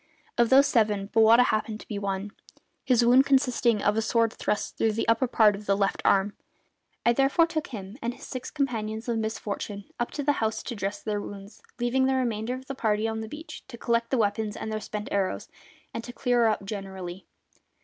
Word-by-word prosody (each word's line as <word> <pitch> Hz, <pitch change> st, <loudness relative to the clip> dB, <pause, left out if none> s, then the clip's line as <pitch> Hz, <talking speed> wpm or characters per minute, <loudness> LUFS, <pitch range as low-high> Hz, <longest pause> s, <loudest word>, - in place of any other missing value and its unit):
Of 235 Hz, -1 st, +3 dB
those 270 Hz, +2 st, +7 dB
seven 210 Hz, -6 st, +1 dB
Bowata 225 Hz, +2 st, +7 dB
happened 215 Hz, -2 st, -1 dB
to -, -, -14 dB
be 205 Hz, -, -4 dB
one, 200 Hz, 0 st, -3 dB, 0.5 s
his 245 Hz, -3 st, +3 dB
wound 255 Hz, +3 st, +6 dB
consisting 250 Hz, -5 st, +2 dB
of 205 Hz, -, +2 dB
a 225 Hz, -, +2 dB
sword 230 Hz, 0 st, +1 dB
thrust 210 Hz, -, -2 dB
through 220 Hz, -1 st, +1 dB
the 225 Hz, -, -2 dB
upper 230 Hz, +3 st, +3 dB
part 215 Hz, -3 st, +4 dB
of 205 Hz, +1 st, -10 dB
the 195 Hz, 0 st, +3 dB
left 195 Hz, -1 st, 0 dB
arm. 200 Hz, +1 st, +3 dB, 0.7 s
I 235 Hz, -, +5 dB
therefore 275 Hz, +6 st, +4 dB
took 315 Hz, -2 st, -3 dB
him 205 Hz, 0 st, -8 dB
and 240 Hz, +1 st, -3 dB
his -, -, -11 dB
six 255 Hz, -2 st, -6 dB
companions 225 Hz, -6 st, -2 dB
in 230 Hz, -2 st, 0 dB
misfortune 210 Hz, -2 st, -4 dB, 0.2 s
up 240 Hz, -, -1 dB
to 290 Hz, -, -3 dB
the 290 Hz, -, +3 dB
house 220 Hz, 0 st, -1 dB
to 240 Hz, -, -5 dB
dress 200 Hz, 0 st, -4 dB
their 210 Hz, -1 st, -2 dB
wounds, 200 Hz, 0 st, -10 dB, 0.2 s
leaving 245 Hz, +2 st, +2 dB
the 265 Hz, -, +2 dB
remainder 240 Hz, -2 st, -1 dB
of 260 Hz, 0 st, -9 dB
the 275 Hz, -, -5 dB
party 220 Hz, -4 st, 0 dB
on 220 Hz, 0 st, -3 dB
the 220 Hz, 0 st, -6 dB
beach 305 Hz, +4 st, -9 dB
to 235 Hz, -, -10 dB
collect 235 Hz, 0 st, 0 dB
the 265 Hz, -, +1 dB
weapons 210 Hz, -1 st, 0 dB
and 220 Hz, -, -5 dB
their 215 Hz, 0 st, -3 dB
spent 210 Hz, 0 st, -5 dB
arrows, 195 Hz, -2 st, -1 dB, 0.4 s
and 230 Hz, -, -4 dB
to 245 Hz, -, -8 dB
clear 245 Hz, -2 st, +2 dB
up 215 Hz, -2 st, 0 dB
generally. 190 Hz, -3 st, -6 dB
225 Hz, 210 wpm, -27 LUFS, 205-245 Hz, 0.7 s, those